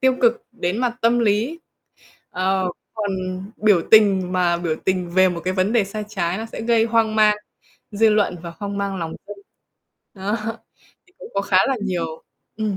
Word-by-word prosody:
tiêu 260 Hz, -1 st, +3 dB
cực 235 Hz, -1 st, +3 dB
đến 190 Hz, -1 st, -2 dB
mặt 245 Hz, -1 st, -1 dB
tâm 235 Hz, +1 st, +4 dB
lý, 230 Hz, +9 st, +1 dB, 0.7 s
ờ, 190 Hz, +1 st, 0 dB, 0.3 s
còn 210 Hz, -2 st, -2 dB, 0.5 s
biểu 205 Hz, -6 st, +3 dB
tình 195 Hz, -4 st, +5 dB
mà 175 Hz, -2 st, +2 dB
biểu 165 Hz, -2 st, -2 dB
tình 180 Hz, -2 st, 0 dB
về 185 Hz, +1 st, +4 dB
một 170 Hz, -1 st, -4 dB
cái 185 Hz, -, 0 dB
vấn 190 Hz, +3 st, +1 dB
đề 230 Hz, -4 st, +3 dB
sai 210 Hz, +2 st, -5 dB
trái 185 Hz, -2 st, -2 dB
nó 225 Hz, -, -5 dB
sẽ 225 Hz, -, -8 dB
gây 230 Hz, -1 st, +3 dB
hoang 225 Hz, -1 st, +1 dB
mang 210 Hz, -1 st, +5 dB, 0.6 s
dư 220 Hz, +2 st, +4 dB
luận 210 Hz, -4 st, +2 dB
và 170 Hz, -1 st, -7 dB
hoang 200 Hz, -1 st, -4 dB
mang 200 Hz, -1 st, -2 dB
lòng 165 Hz, -2 st, -4 dB
dân. 205 Hz, -, -8 dB, 0.8 s
Đó, 200 Hz, +2 st, -2 dB, 0.7 s
thì 365 Hz, -, -29 dB
cũng -, -, -10 dB
có 200 Hz, -, +1 dB
khá 190 Hz, -2 st, +1 dB
là 270 Hz, -1 st, 0 dB
nhiều 165 Hz, -4 st, -3 dB, 0.3 s
ừm, 215 Hz, -3 st, -1 dB
200 Hz, 190 wpm, -21 LUFS, 185-225 Hz, 0.8 s, tình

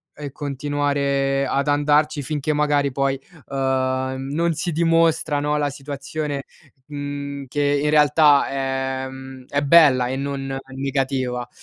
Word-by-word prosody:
e 145 Hz, -2 st, -7 dB
continuare 140 Hz, -1 st, -1 dB
ad 140 Hz, +1 st, 0 dB
andarci 145 Hz, +1 st, +2 dB
finché 150 Hz, +2 st, -2 dB
magari 145 Hz, -1 st, +1 dB
poi, 135 Hz, 0 st, 0 dB, 0.3 s
uhm, 130 Hz, 0 st, -1 dB
non 165 Hz, +3 st, +1 dB
si 165 Hz, +3 st, -2 dB
dimostra, 165 Hz, -2 st, +2 dB
no, 150 Hz, +1 st, 0 dB
la 145 Hz, -1 st, 0 dB
situazione, 140 Hz, +1 st, -5 dB, 0.4 s
mhmm, 145 Hz, -1 st, -5 dB
che 145 Hz, +1 st, +1 dB
in 150 Hz, -, +2 dB
realtà 150 Hz, -1 st, +5 dB
è, 135 Hz, -1 st, -2 dB
mhmm, 130 Hz, -1 st, -10 dB
è 145 Hz, -, -1 dB
bella 140 Hz, -5 st, +6 dB
e 130 Hz, -, -2 dB
non 135 Hz, -1 st, -4 dB, 0.2 s
negativa. 130 Hz, -2 st, -2 dB
140 Hz, 130 wpm, -22 LUFS, 135-150 Hz, 0.4 s, bella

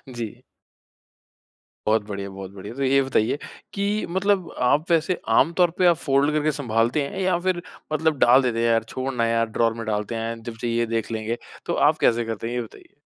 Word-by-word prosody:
जी। 115 Hz, -3 st, -6 dB, 1.4 s
बहुत 110 Hz, -1 st, +3 dB
बढ़िया, 100 Hz, -1 st, -5 dB
बहुत 95 Hz, 0 st, -8 dB
बढ़िया। 100 Hz, +3 st, -9 dB
तो 140 Hz, -, -2 dB
ये 135 Hz, +1 st, +4 dB
बताइए 130 Hz, -1 st, +1 dB, 0.4 s
कि 205 Hz, +1 st, -1 dB
मतलब 190 Hz, -1 st, +1 dB
आप 145 Hz, +7 st, +2 dB
वैसे 165 Hz, +2 st, +2 dB
आम 170 Hz, -, +4 dB
तौर 175 Hz, -2 st, +4 dB
पे 185 Hz, -, +3 dB
आप 170 Hz, -2 st, +4 dB
फोल्ड 140 Hz, -1 st, +2 dB
करके 155 Hz, 0 st, +1 dB
सँभालते 120 Hz, 0 st, 0 dB
हैं 190 Hz, -, -6 dB
या 185 Hz, -2 st, +2 dB
फिर 180 Hz, -1 st, -1 dB, 0.3 s
मतलब 155 Hz, -1 st, +1 dB
डाल 125 Hz, +3 st, +6 dB
देते 115 Hz, -2 st, 0 dB
हैं, 115 Hz, -, +2 dB
यार 115 Hz, -1 st, +3 dB
छोड़ 130 Hz, +3 st, -4 dB
ना 115 Hz, -1 st, +1 dB
यार 115 Hz, 0 st, +2 dB
ड्रॉर 115 Hz, +1 st, +1 dB
में 115 Hz, 0 st, -6 dB
डालते 105 Hz, +2 st, -2 dB
हैं 115 Hz, 0 st, -4 dB
जब 115 Hz, -1 st, -7 dB
चाहिए 120 Hz, 0 st, 0 dB
देख 115 Hz, 0 st, -2 dB
लेंगे। 110 Hz, +1 st, -2 dB, 0.3 s
तो -, -, -1 dB, 0.2 s
आप -, -, 0 dB
कैसे 120 Hz, 0 st, +3 dB
करते 115 Hz, 0 st, -4 dB
हैं 120 Hz, -, -4 dB
ये 120 Hz, -, 0 dB
बताइए? 115 Hz, +5 st, -13 dB
120 Hz, 205 wpm, -24 LUFS, 115-155 Hz, 1.4 s, डाल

